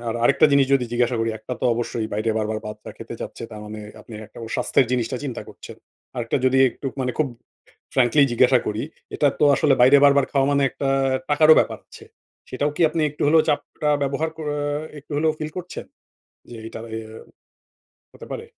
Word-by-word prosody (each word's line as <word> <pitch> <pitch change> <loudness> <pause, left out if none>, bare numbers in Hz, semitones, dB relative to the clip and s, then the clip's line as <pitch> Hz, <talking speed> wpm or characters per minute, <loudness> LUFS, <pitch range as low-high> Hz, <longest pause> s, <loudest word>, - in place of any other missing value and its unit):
আর 115 - -2
আরেকটা 140 - +5
জিনিস 140 -1 +4
যদি 130 -3 +3
জিজ্ঞাসা 120 0 +1
করি, 115 0 0
একটা 125 - -8
তো - - -3
অবশ্যই 115 -1 -3
বাইরে 110 +2 -1
বারবার 110 0 -2
বাচ্চা 105 0 -8
খেতে - - -8
চাচ্ছে, - - -7
তার 110 -1 -9
মানে 105 0 -8 0.2
আপনি 110 - -15
একটা - - -15
ওর 110 - -9
স্বাস্থ্যের 130 - +2
জিনিসটা 125 +1 -1
চিন্তা 130 -4 -5
করছেন। - - -12 0.4
আরেকটা 115 +2 -1
যদি 130 +1 +3
একটু 135 - -8
মানে 125 -1 -1
খুব 150 -3 +1 0.7
frankly 130 +3 +4
জিজ্ঞাসা 125 +1 +4
করি, 105 +1 -2 0.3
এটা 145 - +3
তো - - +2
আসলে 145 -3 +3
বাইরে 135 +3 +7
বারবার 140 -1 +4
খাওয়া 135 -1 +2
মানে 140 0 +2
একটা 135 - -4 0.4
টাকারও 155 +1 +6
ব্যাপার - - -1
আছে। - - -14 0.5
সেটাও 145 +3 -1
কি - - -2
আপনি 160 0 -2
একটু 150 - -11
হলেও 160 +1 +5
চাপটা 150 +1 -1
ব্যবহার 140 +3 -1
ক - - -13 0.6
একটু 150 - -19
হলেও 155 +1 +2
ফিল 155 0 -4
করছেন? 180 0 -7 0.6
যে 120 - -10
এইটা 115 - -8 0.2
এয়া 110 -1 -8 1.0
হতে - - -12
পারে? - - -6
130 Hz, 190 wpm, -22 LUFS, 115-145 Hz, 1.0 s, বাইরে